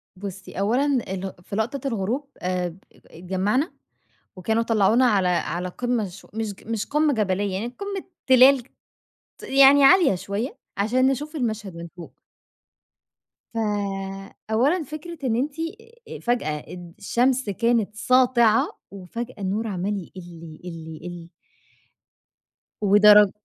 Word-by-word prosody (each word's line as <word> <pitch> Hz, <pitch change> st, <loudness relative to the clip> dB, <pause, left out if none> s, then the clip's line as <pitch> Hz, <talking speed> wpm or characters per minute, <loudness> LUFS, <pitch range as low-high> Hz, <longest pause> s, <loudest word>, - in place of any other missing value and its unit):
بُصّي، 195 Hz, 0 st, -8 dB
أولًا 235 Hz, +8 st, +2 dB
ال 195 Hz, -9 st, -2 dB
في 200 Hz, -, -7 dB
لقطة 250 Hz, +5 st, -2 dB
الغروب 235 Hz, +5 st, -2 dB
آآ، 180 Hz, -2 st, -2 dB, 0.2 s
اتجمّعنا، 190 Hz, -, -2 dB, 0.6 s
وكانوا 220 Hz, +5 st, 0 dB
طلّعونا 225 Hz, +2 st, +3 dB
على 200 Hz, -6 st, +3 dB
على 175 Hz, 0 st, -1 dB
قمة 240 Hz, +2 st, -1 dB
ش 180 Hz, +3 st, -13 dB
مش 220 Hz, -1 st, -3 dB
مش 225 Hz, -1 st, -2 dB
قمة 300 Hz, 0 st, +2 dB
جبلية 200 Hz, -3 st, 0 dB
يعني، 205 Hz, +5 st, -2 dB
قمة 400 Hz, -1 st, -4 dB, 0.2 s
تلال 260 Hz, 0 st, +7 dB, 0.8 s
ت -, -, -16 dB
يعني 275 Hz, +1 st, +6 dB
عالية 345 Hz, -, +6 dB
شوية، 200 Hz, +7 st, -4 dB, 0.2 s
عشان 245 Hz, +6 st, +2 dB
نشوف 295 Hz, +4 st, -1 dB
المشهد 215 Hz, -, -3 dB
من 170 Hz, 0 st, -7 dB
فوق. 170 Hz, -2 st, -12 dB, 1.3 s
ف -, -, -6 dB, 0.9 s
أولًا 285 Hz, +11 st, +2 dB
فكرة 310 Hz, +4 st, -8 dB
إن 235 Hz, -3 st, +1 dB
أنتِ 275 Hz, +5 st, -1 dB, 0.7 s
فجأة 235 Hz, -11 st, 0 dB, 0.2 s
الد 175 Hz, -2 st, -10 dB
الشمس 245 Hz, +2 st, +1 dB
كانت 230 Hz, 0 st, 0 dB
ساطعة، 240 Hz, -2 st, +4 dB, 0.2 s
وفجأة 230 Hz, +6 st, -7 dB
النور 205 Hz, +3 st, -2 dB
عمّال 200 Hz, +1 st, -2 dB
يقلّ، 180 Hz, -, -8 dB, 0.5 s
يقلّ، 165 Hz, -2 st, -8 dB
يقلّ. 175 Hz, 0 st, -8 dB, 1.6 s
ودرج 210 Hz, 0 st, +7 dB
220 Hz, 120 wpm, -24 LUFS, 190-255 Hz, 1.6 s, تلال